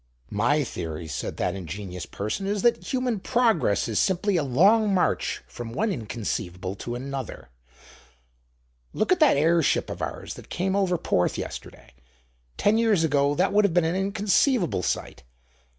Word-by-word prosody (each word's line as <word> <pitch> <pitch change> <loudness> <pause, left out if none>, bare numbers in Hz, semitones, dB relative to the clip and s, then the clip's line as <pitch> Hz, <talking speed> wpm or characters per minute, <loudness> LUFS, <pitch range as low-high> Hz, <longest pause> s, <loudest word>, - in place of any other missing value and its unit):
"My 145 +9 +2
theory," 80 - -5
said 70 - -4
that 90 - 0
ingenious 90 0 -6
person, 110 - -4
"is 205 -1 -1
that 240 - +2
human 250 -4 0
progress 210 - +2
is 110 -3 0
simply 190 +2 +1
a 170 - +3
long 200 - +4
march 185 -2 0
from 115 -1 -8
one 210 - 0
inconceivable 105 - -4
to 120 +4 -5
another. 130 - -6 1.4
Look 215 - 0
at 365 - +4
that 305 - +5
airship 165 +2 +2
of - - -6
ours - - -5
that - - -13
came 190 +2 -1
over 190 -3 +2
Porth 90 - 0
yesterday: - - -8 0.6
ten 215 +2 +3
years 215 -7 +3
ago 145 -2 +2
that - - +1
would 210 +1 +5
have 190 -4 +1
been 175 -2 +4
an 165 +2 0
inconceivable 200 - +1
sight. - - -3
165 Hz, 155 wpm, -25 LUFS, -, 1.4 s, that